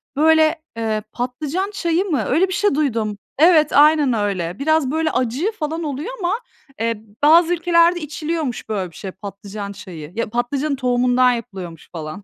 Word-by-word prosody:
Böyle, 315 +2 +4 0.2
eee, 220 -2 -1
patlıcan 290 +11 -3
çayı 350 -2 0
mı? 290 - 0
Öyle 335 +8 +3
bir 370 - -4
şey 410 -5 +1
duydum. 225 -8 -1 0.2
Evet, 310 -1 +5
aynen 295 -2 +5
öyle. 195 -5 -2
Biraz 310 -2 +2
böyle 315 +1 0
acı 255 - 0
falan 325 -5 -4
oluyor 295 - -4
ama, 380 +4 0 0.4
eee, 225 -1 -2 0.2
bazı 330 +3 +6
ülkelerde 340 0 +3
içiliyormuş 305 -5 -4
böyle 190 -5 -2
bir - - -19
şey, 190 - -6
patlıcan 200 +1 -8
çayı. 165 -5 -9
Ya 230 -1 -2
patlıcanın 265 +5 -1
tohumundan 250 -1 +3
yapılıyormuş 190 -8 -7
falan. 160 +4 -7
275 Hz, 155 wpm, -20 LUFS, 215-320 Hz, 0.4 s, bazı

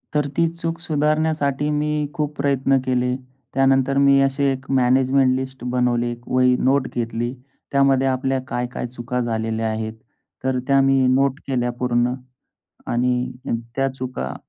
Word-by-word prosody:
तर 150 -1 +2
ती 165 0 +4
चूक 165 0 -4
सुधारण्यासाठी 150 -2 0
मी 150 0 0 0.2
खूप 150 -2 -3
प्रयत्न 135 -1 +2
केले. 125 0 +1 0.4
त्यानंतर 135 0 +3
मी 140 0 +5
अशी 135 +1 +1
एक 135 0 -1
मॅनेजमेंट 130 +1 +3
लिस्ट 130 0 -5
बनवले. 120 -1 +1
एक 120 0 -10
वही 125 0 +3
नोट 135 0 +2
घेतली. 120 +1 -2 0.4
त्यामध्ये 135 -1 +3
आपल्या 130 0 0
काय-काय 125 0 -3
चुका 125 +1 -4
झालेल्या 110 -1 -1
आहेत, 110 0 -3 0.5
तर 130 -1 0
त्या 135 -1 +4
मी 135 0 +4 0.2
नोट 135 +1 +1
केल्या 125 -2 0
पूर्ण 120 0 +1 0.7
आणि 125 +1 0 0.4
त्या 135 0 +1
चुका 130 - -5
130 Hz, 140 wpm, -21 LUFS, 125-140 Hz, 0.7 s, मी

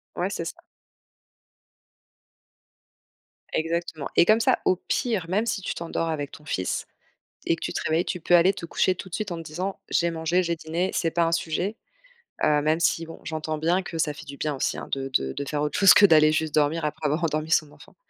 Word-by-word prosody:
Ouais, - - -1
c'est - - -4
ça. - - -5 3.0
Exactement. 165 -2 -2
Et - - +6
comme 215 +4 +5
ça 255 +2 +3
au 185 - +4
pire, 225 -9 0
même 210 +5 +1
si 215 -3 -2
tu - - -3
t'endors 165 0 -3
avec 145 -3 -3
ton 150 - -13
fils 95 -10 -2 0.6
et 165 - +2
que - - -17
tu - - -3
te - - -2
réveilles, 160 +3 +1
tu 180 - -3
peux 175 +2 +3
aller 180 +3 +5
te 175 - -7
coucher 185 +2 +1
tout 185 - -9
de 170 - -4
suite 210 -4 -4
en 170 - -3
te - - -6
disant: 175 +5 -5
«J'ai 170 0 +1
mangé, 165 +3 0
j'ai 170 0 -1
dîné, 165 +4 -2
c'est 165 -2 0
pas 170 0 +2
un 165 - 0
sujet». 175 +6 -1 0.7
Heu, 150 -1 +4
même 155 +2 +1
si, 165 0 +1
bon, 165 - -10
j'entends 155 0 -3
bien 170 +5 +1
que 170 - -7
ça 155 -2 0
fait 155 - -11
du 140 -1 -9
bien 150 -1 -2
aussi, - - -1
hein, - - -7
de 135 -1 -2
de 65 0 -5
de 140 - -4
faire 150 -1 -1
autre 150 - -1
chose 195 -2 +8
que, 205 - +8
heu, - - +7
d'aller 155 -3 +6
juste 155 -1 -1
dormir 150 +1 +1
après 150 +1 -4
avoir 155 +4 -1
endormi 155 0 -1
son 155 -3 +2
enfant. - - -17
165 Hz, 230 wpm, -25 LUFS, 155-175 Hz, 3.0 s, chose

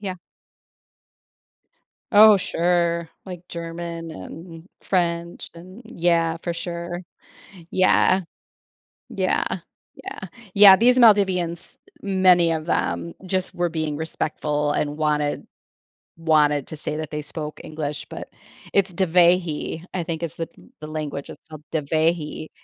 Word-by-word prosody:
Yeah. 195 -3 -4 2.0
Oh 215 0 +9
sure, 170 -2 0 0.2
like, 180 -3 -8
German, 170 0 -6
um, 165 - -10 0.2
French 170 -2 -1
an 185 +5 -12
Yeah, 170 -6 +1
for 175 - -2
sure. 170 +1 -5 0.7
Yeah. 185 0 +4 0.9
Yeah, - - 0 0.5
yeah. 390 - -9 0.4
Yeah, 200 -1 +9
these 245 +4 +4
Maldivians, 190 -7 +3 0.3
many 185 -3 +4
of 160 -1 -3
them, 170 0 -1
just 185 0 -2
were 175 0 0
being 155 -2 -2
respectful 150 -1 -2
and 145 0 -1
wanted 150 -1 0 0.7
wanted 150 -4 +2
to 155 - -7
say 150 0 -4
that 155 -1 -5
they 150 0 -4
spoke 150 0 -7
English, 150 -2 -5
but - - -8 0.4
it's 195 -1 +2
Dhivehi, 175 -2 +2
I 180 -2 -2
think 165 0 -4
is 170 -1 -3
the 165 - -4 0.3
the 155 - -7
language, 150 -2 -5
it's - - -11
called 155 -1 -10
Dhivehi. 155 +1 -1
170 Hz, 120 wpm, -23 LUFS, 155-180 Hz, 2.0 s, Oh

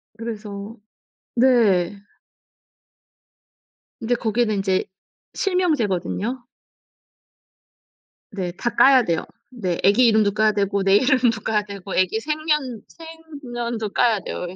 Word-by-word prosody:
그래서 215 -2 -7 0.6
네. 220 -7 +3 2.1
인제 240 +2 0
거기는 225 -1 0
인제 195 -1 0 0.5
실명제거든요. 250 - -1 1.9
네. 185 -3 -4
다 210 +7 -3
까야 265 -2 +6
돼요. 165 -4 -1 0.3
네, 190 -9 -3
애기 205 +6 +5
이름도 215 -2 +3
까야 215 +1 +2
되고 200 -1 -1
내 195 0 +4
이름도 250 -3 +2
까야 215 0 0
되고 200 -2 -8
애기 185 +4 +1
생년 300 -4 -2 0.6
생년도 235 -3 -4
까야 230 -4 +2
돼요, 180 - -6
예. 180 - -10
220 Hz, 220 characters per minute, -22 LUFS, 200-245 Hz, 2.1 s, 까야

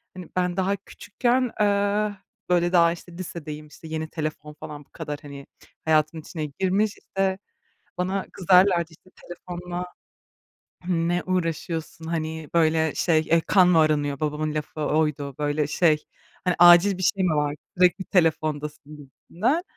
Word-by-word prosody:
hani, 180 -2 -9
ben 180 0 0
daha 190 +1 +1
küçükken, 240 +5 -1
eee, 205 0 +1 0.3
böyle 175 0 +2
daha, 170 -1 +5
işte, 175 +1 -9
lisedeyim, 155 -4 -7
işte, 160 +2 -13
yeni 160 0 -4
telefon 155 -1 -5
falan 150 -1 -9
bu - - -40
kadar, 145 0 -6
hani, 140 -1 -10 0.4
hayatın 155 +1 +2
içine 155 0 -5
girmiş, 200 +3 +1
işte, 190 -1 -1 0.6
bana 190 +2 -1
kızarlardı. 180 -2 +4
"İşte, 175 +3 -20 0.2
telefonla 175 0 -6 1.0
ne 175 0 0
uğraşıyorsun?" 165 -2 -3
Hani, 160 -2 -4
böyle 160 -2 +2
şey, 160 -2 +2
"E, 165 0 +4
kan 185 +2 +4
mı 170 -3 +5
aranıyor?" 145 -3 +1
Babamın 155 0 -2
lafı 155 0 -4
oydu, 150 -2 0
böyle 145 0 0
şey, 155 -1 +2 0.4
hani, 180 -1 +1
"Acil 175 +3 +7
bir 185 - -4
şey 190 +1 +2
mi 165 -4 +2
var? 150 0 0 0.2
Sürekli 180 +1 +3
telefondasın" 155 -4 -1
gibisinden. 185 - -2
165 Hz, 145 wpm, -24 LUFS, 155-185 Hz, 1.0 s, Acil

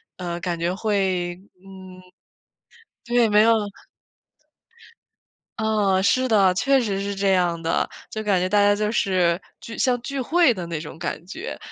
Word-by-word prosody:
呃， 175 -1 -5
感 175 -1 -3
觉 170 +2 -1
会， 190 -4 -1 0.2
嗯 185 -1 -13 1.1
对， 240 -1 +3
没 210 0 +5
有 230 +1 +5 2.1
嗯， 210 -3 +1
是 255 +6 +2
的， 200 -5 +4
确 270 +8 +2
实 200 -5 -2
是 200 0 -3
这 195 0 0
样 175 -3 +1
的。 165 - 0 0.2
就 220 - -4
感 200 -3 +2
觉 180 - 0
大 205 +2 +2
家 205 0 +4
就 210 0 -1
是 185 -5 +1 0.2
聚 230 - -9
像 250 -2 +1
聚 275 +1 -4
会 325 +1 +3
的 180 -5 -6
那 165 -2 -4
种 155 +1 -9
感 165 - -5
觉， 190 - -7
195 Hz, 170 characters per minute, -23 LUFS, 180-220 Hz, 2.1 s, 没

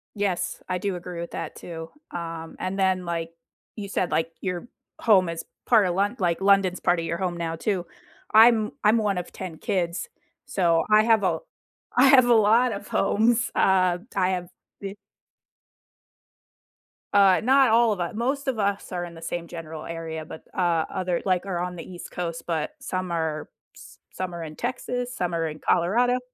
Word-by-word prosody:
Yes, 200 -4 -1
I 185 - -1
do 195 +1 -2
agree 175 0 -7
with 170 - -6
that 165 - -5
too. 165 -1 -8 0.2
Um, 165 -1 -6
and 185 +1 -3
then, 185 -1 +2
like, 165 -1 -3 0.4
you 205 -2 -6
said, 185 -3 -1
like, 165 +1 0
your 180 +3 -3 0.3
home 190 -6 +4
is 165 0 -5 0.2
part 225 -4 +5
of 175 -1 0
Lon 200 +5 +1
like, 175 -2 0
London's 195 -2 +3
part 175 -1 +2
of 165 - -3
your 170 - -2
home 180 -1 -2
now 165 -1 -2
too. 180 +1 -1 0.5
I'm 220 -1 +6
I'm 215 +2 +5
one 205 -4 0
of 180 - -5
10 180 -4 -7
kids, 180 - -2 0.4
so 170 -10 +2
I 215 0 +7
have 225 -2 +4
a 185 - +1 0.6
I 255 - +7
have 265 -2 +7
a 245 - +5
lot 230 +3 +4
of 200 +1 -7
homes. 225 +4 +2
Uh, 185 -2 +3 0.2
I 185 -2 +2
have 180 -1 -3 0.3
be 195 0 -5 2.2
Uh, 195 -2 +5
not 265 +1 +5
all 230 0 +5
of 205 - -2
u 175 +3 -3
most 275 +4 -1
of 255 -4 -1
us 200 -1 -1
are 180 -1 -2
in 170 -1 -8
the 165 - -11
same 170 +1 -4
general 160 -2 -7
area 165 -1 -5
but, 160 - -10
uh, 170 -3 +2
other 180 -2 -1
like, 185 -1 +1
are 190 -3 -2
on 180 0 -3
the 165 - -7
East 180 -2 -10
Coast, 170 -2 -4
but 160 -3 -2
some 185 -1 -3
are 160 -2 -2 0.3
s - - -14
some 185 -1 -4
are 170 - -5
in 155 -1 -8
Texas, 245 +1 -3
some 175 -1 -2
are 165 -1 0
in 155 0 -7
Colorado 240 +12 +2
185 Hz, 190 wpm, -25 LUFS, 170-210 Hz, 2.2 s, I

